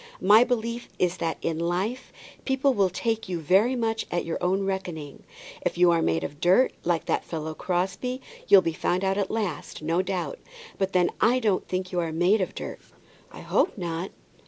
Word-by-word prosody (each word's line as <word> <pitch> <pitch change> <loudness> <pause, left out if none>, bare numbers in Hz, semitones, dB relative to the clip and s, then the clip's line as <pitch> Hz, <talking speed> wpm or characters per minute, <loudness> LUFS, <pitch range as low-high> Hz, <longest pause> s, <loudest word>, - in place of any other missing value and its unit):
My 210 +5 +7
belief 235 -1 -2
is 180 0 +1
that 165 -1 -2
in 160 -1 -1
life 185 +9 -2 0.3
people 270 0 +2
will 200 -5 +2
take 225 +2 -2
you 175 -2 -2
very 195 - +3
much 225 -2 -1
at 175 - -1
your 165 - -3
own 190 +2 +1
reckoning. 180 -7 -4 0.4
If - - -2
you 175 0 +6
are 165 -1 +2
made 80 - +1
of 145 - -7
dirt, 190 +9 +4
like 170 -1 0
that - - 0
fellow 160 -1 -5
Crosbie, 190 +10 -2 0.3
you'll 195 -2 +7
be 165 -1 -1
found 180 +3 -1
out 195 +1 +1
at 195 - -1
last, 215 -7 -3
no 165 +3 +1
doubt. 190 - -3 0.4
But 195 -1 0
then 180 -1 +3
I 240 +3 +4
don't 215 -6 0
think 185 0 -3
you 180 - 0
are 165 -2 -1
made 180 +6 +3
of 185 - -3
dirt." - - -6 0.5
"I - - -10
hope - - +1
not." 175 0 -3
185 Hz, 195 wpm, -26 LUFS, 170-220 Hz, 0.5 s, My